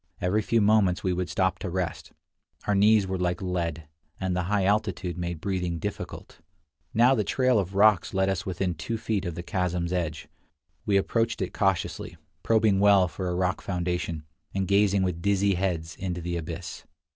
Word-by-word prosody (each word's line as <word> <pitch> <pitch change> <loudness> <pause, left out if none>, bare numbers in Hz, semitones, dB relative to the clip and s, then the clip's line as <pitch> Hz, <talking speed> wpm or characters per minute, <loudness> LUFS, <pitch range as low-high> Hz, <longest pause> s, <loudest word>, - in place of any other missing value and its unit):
Every 95 +5 +1
few 115 +2 +1
moments 100 -3 +3
we 90 - +1
would 90 0 -2
stop 95 -1 0
to 95 - -4
rest; 90 -2 -3 0.5
our 105 - +1
knees 105 +1 +5
were 95 -1 -3
like 90 0 0
lead, 85 -4 -3 0.3
and 95 -1 -1
the 90 -1 -1
high 100 -2 +2
altitude 100 -4 0
made 85 -2 -4
breathing 90 -2 -2
difficult. 80 - -6 0.5
Now 120 +4 +5
the 110 -5 +1
trail 125 +3 +2
of 95 0 -3
rocks 105 -2 +4
led 95 -1 +1
us 95 -2 -1
within 90 -1 -2
two 85 +9 -4
feet 110 -3 -2
of 85 -2 -4
the 85 - -5
chasm's 90 -2 -1
edge; 80 -4 -3 0.6
we 100 -1 +4
approached 115 +3 0
it 95 - -3
cautiously, 95 -2 -1 0.2
probing 110 -3 +3
well 100 -2 +5
for 90 +3 -4
a 90 - -1
rock 90 0 0
foundation, 90 -3 -2 0.3
and 95 -1 0
gazing 100 -1 +3
with 90 -2 -2
dizzy 100 0 +2
heads 85 -3 -2
into 90 -2 -4
the 85 +1 -3
abyss. 85 +1 -6
95 Hz, 180 wpm, -27 LUFS, 90-100 Hz, 0.6 s, knees